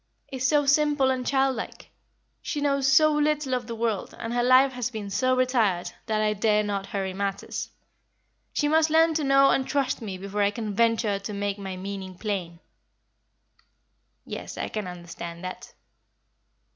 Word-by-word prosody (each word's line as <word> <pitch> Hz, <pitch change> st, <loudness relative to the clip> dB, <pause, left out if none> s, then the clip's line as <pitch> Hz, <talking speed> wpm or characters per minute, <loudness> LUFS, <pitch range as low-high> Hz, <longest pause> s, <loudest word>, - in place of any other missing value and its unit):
"is 260 Hz, -1 st, 0 dB
so 290 Hz, +1 st, +3 dB
simple 290 Hz, -2 st, +3 dB
and 255 Hz, -1 st, -2 dB
childlike; 270 Hz, -3 st, -1 dB, 0.5 s
she 295 Hz, -, -3 dB
knows 275 Hz, -2 st, +2 dB
so 310 Hz, +2 st, +6 dB
little 300 Hz, -2 st, +1 dB
of 250 Hz, -, -2 dB
the 230 Hz, -, -5 dB
world, 225 Hz, -3 st, -2 dB
and 230 Hz, +1 st, -4 dB
her 245 Hz, -, +1 dB
life 255 Hz, +2 st, +5 dB
has 250 Hz, -2 st, -3 dB
been 215 Hz, -4 st, -6 dB
so 255 Hz, +5 st, +2 dB
retired, 230 Hz, -9 st, +1 dB, 0.2 s
that 215 Hz, -1 st, 0 dB
I 210 Hz, 0 st, +2 dB
dare 210 Hz, 0 st, +2 dB
not 200 Hz, -1 st, -3 dB
hurry 190 Hz, -2 st, -3 dB
matters. 195 Hz, 0 st, -3 dB, 0.8 s
She 295 Hz, -, 0 dB
must 315 Hz, +1 st, +3 dB
learn 325 Hz, +1 st, +4 dB
to 310 Hz, -1 st, 0 dB
know 275 Hz, 0 st, +5 dB
and 265 Hz, -, +1 dB
trust 280 Hz, -3 st, 0 dB
me 200 Hz, -4 st, -5 dB
before 200 Hz, +2 st, -3 dB
I 200 Hz, -, +4 dB
can 210 Hz, 0 st, -4 dB
venture 225 Hz, -2 st, +2 dB
to 200 Hz, +1 st, -6 dB
make 200 Hz, 0 st, -2 dB
my 190 Hz, -2 st, -5 dB
meaning 190 Hz, -1 st, -6 dB
plain." 180 Hz, -6 st, -4 dB, 1.7 s
"Yes, -, -, -7 dB
I -, -, -3 dB
can 215 Hz, -3 st, -4 dB
understand 170 Hz, -1 st, -8 dB
that." 185 Hz, 0 st, -7 dB
230 Hz, 170 wpm, -26 LUFS, 200-270 Hz, 1.7 s, so